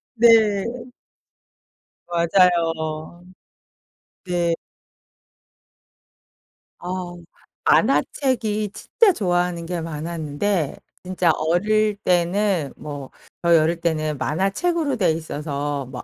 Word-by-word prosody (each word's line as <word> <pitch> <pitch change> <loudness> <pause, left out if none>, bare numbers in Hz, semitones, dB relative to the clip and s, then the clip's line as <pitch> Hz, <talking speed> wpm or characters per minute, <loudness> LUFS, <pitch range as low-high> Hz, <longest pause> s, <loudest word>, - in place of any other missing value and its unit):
네. 235 +1 +5 1.8
맞아요. 170 -2 +1 1.0
네. 175 -2 +1 2.3
어. 180 0 -5 0.5
만화책이 215 -7 +1
진짜 435 -5 +2
좋아하는 175 - -1
게 175 +1 -3
많았는데 160 +1 -2 0.3
진짜 180 -2 +1
어릴 210 +6 +1
때는 180 -2 +1
뭐 145 -3 -8 0.3
저희 170 -1 +5
어릴 165 +2 +1
때는 155 -3 -1
만화책으로 260 - 0
되어 185 -6 +2
있어서 145 -3 -3
뭐 130 0 -8
175 Hz, 170 characters per minute, -22 LUFS, 155-195 Hz, 2.3 s, 네